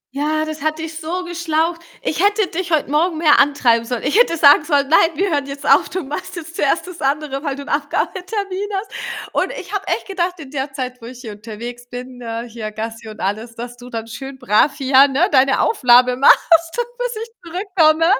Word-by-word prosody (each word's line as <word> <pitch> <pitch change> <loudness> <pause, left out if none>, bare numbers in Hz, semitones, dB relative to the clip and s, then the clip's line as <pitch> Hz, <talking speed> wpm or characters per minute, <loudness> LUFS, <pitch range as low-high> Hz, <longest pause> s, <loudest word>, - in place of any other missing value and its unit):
Ja, 310 +2 0
das 310 -1 -6
hat 310 +1 -1
dich 320 0 -6
so 345 +3 -3
geschlaucht. 335 -1 -1 0.2
Ich 325 +5 -1
hätte 410 0 +3
dich 360 +1 -4
heut 310 -4 +2
Morgen 315 +3 +1
mehr 310 -3 +5
antreiben 265 -5 +3
sollen. 240 0 -4
Ich 285 - 0
hätte 335 -9 +3
sagen 290 0 +7
sollen: 285 -3 +1
„Nein, 330 +2 +5
wir 380 +2 0
hören 285 -2 0
jetzt 280 +1 -7
auf. 275 - +5
Du 370 -2 -3
machst 300 +7 -6
jetzt 330 0 -8
zuerst 295 +3 +1
das 360 -2 -10
andere, 275 0 -1
weil 280 -3 -2
du 280 - -7
'nen - - -3
Abgabetermin 380 +6 -2
hast.“ 390 +3 -4 0.4
Und - - 0
ich - - -10
habe 400 -1 -3
echt - - -1
gedacht 365 -2 -2
in 280 -4 -10
der 275 0 -3
Zeit, 255 -2 -5
wo 230 - -9
ich 250 0 -10
hier 225 -4 -7
unterwegs 235 +3 -9
bin, 250 0 -8
äh, 230 0 -5
hier, 220 -2 -6
Gassi 225 +1 -6
und 215 - -10
alles, 220 +4 -3
dass 240 +1 -7
du 245 0 -12
dann 225 -2 -5
schön 265 +4 -8
brav 250 +2 +2
hier, 270 +1 +5
ne, 285 +7 +1
deine 270 0 +4
Aufnahme 250 - +4
machst, 330 +5 +5 0.3
bis - - -2
ich 460 - -10
zurückkomme. 335 -3 +2
290 Hz, 215 wpm, -19 LUFS, 250-335 Hz, 0.4 s, sagen